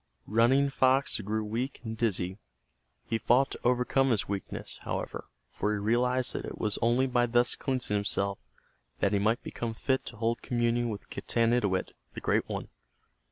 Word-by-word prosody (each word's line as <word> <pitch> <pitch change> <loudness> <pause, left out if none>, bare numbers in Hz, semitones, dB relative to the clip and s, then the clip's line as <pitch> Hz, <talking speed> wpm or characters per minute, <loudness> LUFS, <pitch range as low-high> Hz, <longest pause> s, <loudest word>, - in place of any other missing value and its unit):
Running 130 +6 +3
Fox 130 -1 +3
grew 110 +1 -2
weak 120 +6 -3
and 110 -1 -4
dizzy. 100 -4 -1 0.7
He 115 - -1
fought 125 +4 +3
to - - -5
overcome 125 +2 +2
his 115 -5 +1
weakness, 100 -1 -5
however, - - -4 0.3
for 105 - -1
he - - 0
realized 125 +4 +1
that - - -3
it - - -6
was 105 -2 -1
only 120 +3 +3
by 120 -2 +2
thus 120 +1 +3
cleansing 130 -6 -2
himself 100 -1 0 0.6
that 100 - +2
he 100 - +3
might 110 +4 +1
become 115 -1 -4
fit 130 +3 0
to 120 - -8
hold 115 +1 0
communion 120 0 0
with 105 -2 -7
Getanittowit, 115 -5 +1 0.2
the - - -4
Great - - 0
One. - - -4
115 Hz, 165 wpm, -29 LUFS, 105-125 Hz, 0.7 s, Running